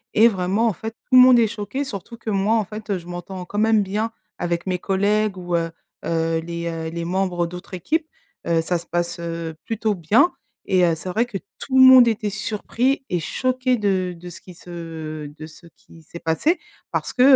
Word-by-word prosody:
Et 225 +2 +7
vraiment, 195 +2 +1
en 215 - +1
fait, 220 +4 -6
tout 255 - +2
le - - +10
monde 255 -1 +8
est 230 - +5
choqué, 215 +5 -4
surtout 230 -2 -7
que 220 -2 -4
moi, 200 +3 +2
en 215 -3 +1
fait, 215 +1 -9
heu, 195 - +1
je 170 - -11
m'entends 180 +1 -7
quand 205 +3 -4
même 220 -1 +4
bien 215 +4 -2 0.3
avec 170 0 -1
mes 180 -1 -1
collègues 200 +1 +1
ou, 175 -1 -2
heu 165 0 0 0.4
heu, 165 0 0
les, 170 +1 -5
heu, 160 -1 -4
les 170 0 -4
membres 180 -1 0
d'autres 180 +2 -8
équipes. 310 - -1 0.4
Heu, 165 -1 +3
ça 175 +1 0
se - - -14
passe, 175 0 -2
heu, 165 -1 -4
plutôt 220 -1 -1
bien 210 - +3 0.4
et 185 -2 +3
heu, 165 -2 +3
c'est 180 +3 -7
vrai 230 +6 +1
que 200 - -4 0.2
tout 265 -1 -1
le 260 - +9
monde 255 -2 +9
était 215 -2 0
surpris 235 +6 -1
et 175 - 0
choqué 255 +7 0
de 185 -4 0
de 175 +1 -9
ce - - -12
qui 180 -2 -13
se 160 -3 -7
de 155 +2 -10
ce 160 +2 -15
qui 165 - -18
s'est 165 +2 -11
passé 295 - +1 0.3
parce - - -2
que, 250 - 0
190 Hz, 220 wpm, -22 LUFS, 170-225 Hz, 0.4 s, le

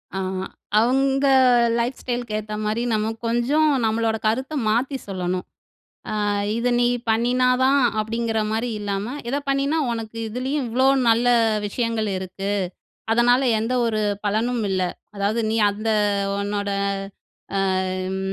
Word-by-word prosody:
ஆ. - - -1 0.6
அவுங்க 270 +3 +2 0.5
life 245 +3 -2
style 245 -1 -2
க்கு 215 - -7
ஏத்தமாரி 215 +1 -3
நம்ம 215 0 0
கொஞ்சம் 245 +7 +2 0.2
நம்மளோட 225 0 +1
கருத்த 260 +7 0
மாத்தி 255 +5 +1
சொல்லணும். 185 -2 -3 0.8
ஆ - - +1 0.3
"இத 245 +1 0
நீ 240 - +3 0.2
பண்ணினாதான்!" 250 +4 +3 0.2
அப்படிங்கிற 225 +1 -1
மாரி 230 +2 -1
இல்லாம, 205 +4 -3
"இத 275 - 0
பண்ணினா 275 +3 +1
உனக்கு 225 -1 -5
இதுலேயும் 260 +4 -2
இவ்ளோ 260 +3 +2 0.2
நல்ல 230 +2 +3 0.4
விஷயங்கள் 230 0 -1
இருக்கு. 190 +2 -5 0.6
அதனால 245 +2 +4 0.2
எந்த 225 +3 -1
ஒரு 215 -2 0 0.2
பலனும் 225 +3 0
இல்ல. 185 -1 0 0.3
அதாவது, 205 +3 0
நீ 225 - 0
அந்த 215 +2 -3 0.5
உன்னோட 205 0 -2 0.9
அம் 185 0 -1
230 Hz, 120 wpm, -22 LUFS, 210-250 Hz, 0.9 s, அதனால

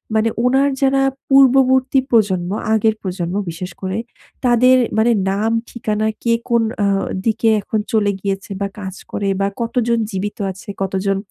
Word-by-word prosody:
মানে 220 +1 +3 0.2
উনার 270 +3 +3
যারা 270 0 +3 0.3
পূর্ববর্তী 265 0 +5
প্রজন্ম, 190 -6 +2 0.2
আগের 220 0 +2
প্রজন্ম 180 -1 -3 0.2
বিশেষ 180 +2 -6
করে 190 +2 -3 0.5
তাদের 250 +1 +5 0.2
মানে 235 +2 +4 0.2
নাম 215 +3 0 0.2
ঠিকানা 215 -2 -2 0.2
কে, 230 -1 +2 0.2
কোন 235 -1 +3 0.2
অ্যা 200 - +2 0.4
দিকে 225 0 +2
এখন 215 +2 -2
চলে 205 -2 +3
গিয়েছে 195 0 -3
বা 200 - 0
কাজ 190 -1 -6 0.2
করে 200 - -2
বা 195 - +2
কতজন 235 0 0
জীবিত 200 +2 -4
আছে, 190 +2 -12
কতজন 195 +1 -1
220 Hz, 150 wpm, -18 LUFS, 195-240 Hz, 0.5 s, পূর্ববর্তী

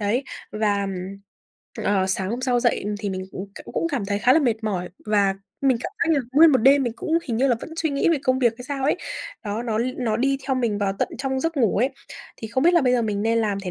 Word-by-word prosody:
Đấy, 225 +6 0 0.3
và, 205 -2 +1
ừm, 195 0 -5 0.7
ờ, 195 -2 +2
sáng 190 0 -1
hôm 240 +2 -3
sau 250 -2 +1
dậy, 240 -2 +1
ừm, 210 - -2
thì 205 -1 -3
mình, 185 0 -4
ừm, 190 - -5 0.2
cũng - - -11
cũng - - 0
cảm 245 -7 -1
thấy 200 0 -1
khá 245 +4 +4
là 315 - +5
mệt 230 -6 0
mỏi 185 -4 -2 0.2
và 200 -2 +2 0.3
mình 265 -3 +4
cảm - - -4
giác 325 -1 +2
là 280 - +2
nguyên 315 +4 +7
một 260 - +5
đêm 270 +4 +5
mình 240 -3 -1
cũng 335 -3 0
hình 235 -4 -2
như 265 +4 +2
là 240 - +3
vẫn - - -8
suy 325 -1 0
nghĩ 280 +3 +1
về 330 -3 +3
công 255 -1 +2
việc 235 -3 +3
hay 250 - -8
sao 270 0 -3
ấy, 295 - +2 0.5
đó, 210 +2 -3
nó 225 -3 -1
l 235 - +1
nó 225 -4 0
đi 275 +2 +1
theo 270 - +1
mình 225 -5 0
vào 195 -1 0
tận - - +1
trong 265 -1 -1
giấc 325 +1 -2
ngủ 225 -7 +2
ấy, 250 +6 +2 0.5
thì 220 - -7
không 260 +4 0
biết 350 +1 +5
là 340 - +6
bây 250 -1 +3
giờ 240 -2 +2
mình 205 -2 -1
nên 230 +1 +2
làm 210 -3 0
thế 185 -2 -5
235 Hz, 285 wpm, -23 LUFS, 205-270 Hz, 0.7 s, nguyên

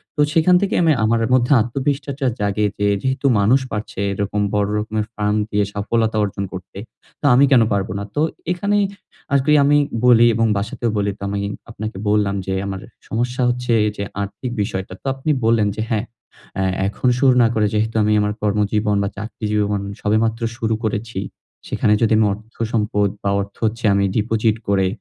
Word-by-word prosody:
তো 150 - +1
সেখান 165 +3 +4
থেকে 200 - 0
আমি 160 - +4
আমার 115 +1 +2
মধ্যে 125 0 +3
আত্মবিশ্বাসটা 135 +3 -2
জাগে 105 +1 0
যে 105 - +2
যেহেতু 130 +2 -2
মানুষ 110 +7 +4
পারছে 105 -2 -5
এরকম 100 +1 -2
বড় 105 -1 +1
রকমের 105 0 -2
ফার্ম 105 0 0
দিয়ে 105 0 +1
সফলতা 110 +2 0
অর্জন 100 -1 -3
করতে। 95 +1 -9 0.4
তো - - -4
আমি 135 +3 +6
কেন 125 -4 +6
পারব 100 -1 0
না? - - -4
তো 150 - +1 0.3
এখানেই 200 +3 +1 0.5
আরকি 140 +2 +3
আমি 145 +1 +4 0.3
বলি 120 -1 +7
এবং 115 - +2
বাসাতেও 110 +3 -2
বলি 100 0 0
তো - - -32
আমি 100 - -2 0.3
আপনাকে 110 -3 -6
বললাম 105 -1 +2
যে 95 - -2
আমার 95 -1 -4 0.3
সমস্যা 125 +3 -2
হচ্ছে 125 0 -2
এই 105 - 0
যে 100 - -2 0.2
আর্থিক 100 +5 -5
বিষয়টা। 95 -2 -4
তো - - -56
আপনি 135 +3 -4 0.2
বললেন 115 -2 +3
যে 110 - -3
হ্যাঁ, 110 -1 0 0.5
অ্যা 95 - 0 0.2
এখন 105 - -2
শুরু 130 -2 +4
না - - +5
করে 105 -1 +2
যেহেতু 110 +1 0
আমি 105 - +2
আমার 105 0 0
কর্মজীবন 105 0 +1
বা 100 - -1
চাকরি 110 +1 -6
জীবন 105 -1 0 0.2
সবেমাত্র 110 +2 +1 0.2
শুরু 115 -2 0
করেছি। 110 -1 -3 0.5
সেখানে 105 - +1
যদি 115 -1 +3
আমি 110 - +4
অর্থ 110 +3 -13 0.2
সম্পদ 105 -2 +1 0.2
বা 100 - +1
অর্থ 100 0 -8
হচ্ছে 115 +1 -2
আমি 100 0 +2
ডিপোজিট 110 0 +1
করে 95 -2 +2
110 Hz, 180 wpm, -20 LUFS, 100-120 Hz, 0.5 s, বলি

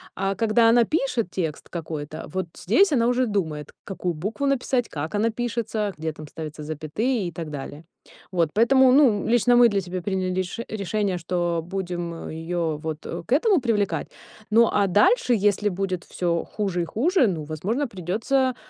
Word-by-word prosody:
А 195 +1 -1
когда 225 +2 +4
она 235 +1 +6
пишет 260 - 0
текст 160 -5 -4
какой-то, 155 -2 -6
вот 185 -1 -2
здесь 380 - +3
она 235 -3 +3
уже 250 +1 +2
думает, 160 -8 -2
какую 180 -2 -3
букву 215 - -2
написать, 255 -3 0
как 155 +6 -4
она 215 +3 +2
пишется, 225 -3 -2
где 160 +1 -3
там 155 0 -10
ставятся 155 0 -7
запятые 175 - -2
и 170 - -5
так 160 -1 -6
далее. 145 +2 -7 0.5
Вот 170 -4 +1
поэтому, 260 +4 +5
ну, 255 -8 +4
лично 240 +1 +4
мы 240 0 +8
для 200 -2 0
себя 185 0 -5
приняли 185 0 -1
реш 185 +3 -3
решение, 200 -2 -1
что 175 -1 -1
будем 175 -2 -4
её 165 0 -2
вот, 155 0 -6
э, 170 - -5
к 240 - +1
этому 370 +5 +4
привлекать. 210 -5 0 0.4
Ну, 230 +1 +5
а 200 -1 +2
дальше, 215 - +4
если 205 0 +2
будет 185 -1 -3
всё 170 -2 -1
хуже 195 -4 -2
и - - -3
хуже, 280 - +2
ну, 165 -6 -2
возможно, 195 - -2
придётся, 230 +7 0
195 Hz, 175 wpm, -24 LUFS, 170-230 Hz, 0.5 s, мы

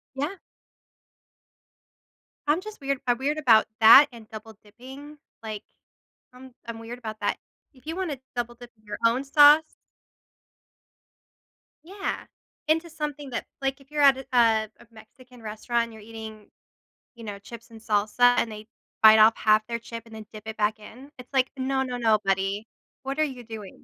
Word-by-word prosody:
Yeah. 295 +8 -3 2.1
I'm 305 +4 +3
just 430 -2 -10
weird 275 -1 -2
I'm 245 -1 +2
weird 285 +3 -1
about 230 -7 +5
that 230 +6 +9
and 230 -3 -14
double 220 0 -10
dipping, 265 +7 -12 0.3
like, 215 -1 -6 0.7
I'm 260 +1 -14 0.2
I'm 230 -1 -6
weird 230 +2 -8
about 220 -3 -8
that. - - 0 0.4
If 260 0 -23
you 325 +1 -4
wanna 355 -7 -3 0.2
double 240 0 -3
dip 240 0 -13
in 215 - -31
your 210 0 -6
own 235 +4 +2
sauce 295 +2 +6 2.1
Yeah, 390 +3 -5 0.4
into 325 +2 +1
something 295 -3 -6
that 240 - -4 0.2
like, 270 +1 -2
if 275 +1 -21
you're 300 -1 0
at 275 -2 +6
a 225 -3 +3
a - - -17
Mexican 240 +2 -17
restaurant 225 +2 -2
and 230 - -11
you're 220 -1 -13
eating, 220 -1 -10 0.7
you 235 - -12
know, 205 -2 -7
chips 230 +3 -12
and 225 -1 -13
salsa 220 +3 +3
and 225 - 0
they 215 0 -10 0.4
bite 220 0 +9
off 220 +1 +6
half 215 0 +3
their 235 0 -3
chip 230 0 -9
and 225 - -15
then 220 -1 -9
dip 215 -1 -10
it 220 - -6
back 215 0 0
in, 245 +6 -13
it's 250 -1 -13
like, 260 -1 +2
"No, 265 0 0
no, 250 -1 -4
no, 225 -3 +3
buddy, 195 +2 -1 0.4
what 270 +2 -4
are - - +4
you 260 -5 -5
doing?" 220 -4 -10
235 Hz, 175 wpm, -25 LUFS, 220-275 Hz, 2.1 s, that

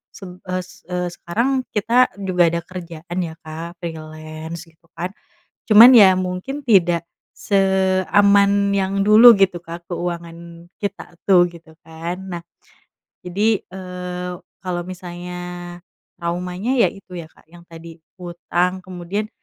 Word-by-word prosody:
sem 180 -2 -11
es 185 0 -6
eee, 180 -1 -3
sekarang 245 +10 -1
kita 235 +4 +3 0.2
juga 180 -2 +3
ada 170 0 -1
kerjaan 175 -1 -7
ya 165 -3 -3
Kak 170 +2 -8
freelance 155 0 -7
gitu 165 0 -25
kan, 180 +2 -4 0.6
cuman 225 +4 +11
ya 200 -5 +8
mungkin 185 +10 -4
tidak 175 -6 +3 0.3
seaman 200 +1 +3
yang 195 0 0
dulu 215 +4 +9
gitu 195 -4 +2
Kak 170 0 -10
keuangan 170 -1 -6
kita 195 -4 -6
tuh 175 -3 +5
gitu 170 -2 -16
kan 165 +2 -6 0.2
nah, 170 - -11 0.8
jadi, 205 +4 +1
eee, 180 -1 -6 0.3
kalo 180 -1 -2
misalnya 180 -1 -8 0.8
traumanya 180 +5 -3
ya - - +5
itu 195 -2 -14
ya 165 -2 -8
Kak - - -25
yang 175 0 -15
tadi 165 0 -12 0.2
hutang 180 +1 -2
kemudian 185 +3 -5
180 Hz, 125 wpm, -20 LUFS, 170-195 Hz, 0.8 s, cuman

